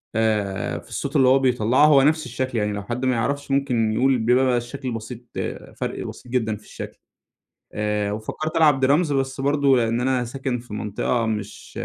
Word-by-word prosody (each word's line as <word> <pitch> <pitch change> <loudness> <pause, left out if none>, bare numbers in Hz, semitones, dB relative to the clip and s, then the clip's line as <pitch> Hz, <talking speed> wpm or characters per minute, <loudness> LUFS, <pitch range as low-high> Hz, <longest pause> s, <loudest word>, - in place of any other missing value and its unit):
آآ 105 -4 0
في - - -17
الصوت 140 +2 -4
اللي 135 -3 +5
هو 130 +1 +5
بيطلّعه، 125 +2 +3
هو 145 -3 +6
نفْس 155 +3 +2
الشكل 125 0 -3
يعني، 105 -1 0
لو 100 0 -4
حد 120 +5 -3
ما 130 -1 +2
يعرِفش 140 +5 -2
ممكن 125 -5 +1
يقول، 130 +3 +3
بيبقى 125 +2 +3
الشكل 125 +2 -5
بسيط 115 +1 -6 0.2
آآ، - - -5
فرق - - -4
بسيط 125 - -10
جدًا 110 -4 0
في 105 - -14
الشكل. - - -9 0.8
آآ 105 -1 -1
وفكَّرت 110 +9 -4
ألعب 145 -5 +4
drums، 145 +2 +3
بس 135 0 -1
برضه 140 -2 +3
لأن 115 0 +1
أنا 130 -1 +1
ساكن 130 0 -3
في 115 -2 -11
منطقة 105 +3 -1
مش 105 -2 -5
125 Hz, 185 wpm, -23 LUFS, 110-135 Hz, 0.8 s, هو